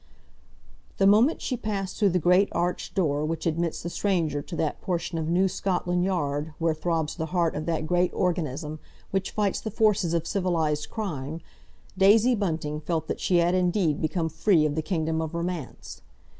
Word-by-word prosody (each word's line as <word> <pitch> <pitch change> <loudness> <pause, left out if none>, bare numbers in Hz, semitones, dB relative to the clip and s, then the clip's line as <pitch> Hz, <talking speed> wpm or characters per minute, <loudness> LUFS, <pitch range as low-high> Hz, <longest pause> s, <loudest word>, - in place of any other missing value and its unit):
The 195 - +3
moment 220 +10 +4
she 255 - -1
passed 200 -4 -4
though 205 -3 +4
the 180 - +1
great 180 +4 +4
arched 175 +2 -2
door 150 -6 +1
which 160 +1 -3
admits 165 0 -1
the 170 - -3
stranger 170 -8 0
to 170 - -8
that 155 -2 -2
portion 170 -2 -2
of 160 0 -2
New 185 +3 +3
Scotland 180 -1 -1
Yard 150 -4 -1
where 165 -1 +1
throbs 160 -1 -1
the 160 -2 -3
heart 170 -1 +1
of 155 +2 -4
that 160 -2 -1
great 175 +2 +2
organism 155 -3 -2 0.3
which 195 -1 -1
fights 205 -2 -1
the 220 - -4
forces 205 -5 +2
of 165 - -1
civilised 165 -6 0
crime, 160 - -4 0.6
Daisy 215 +6 +6
Bunting 160 -8 -2
felt 160 0 -2
that - - -2
she 180 - +2
had 170 +1 +3
indeed 180 -4 +1
become 160 +1 0
free 160 +1 +2
of 150 - 0
the 160 - -1
Kingdom 160 -1 -1
of 160 +1 -4
Romance. 170 -4 -5
170 Hz, 180 wpm, -26 LUFS, 155-190 Hz, 0.6 s, Daisy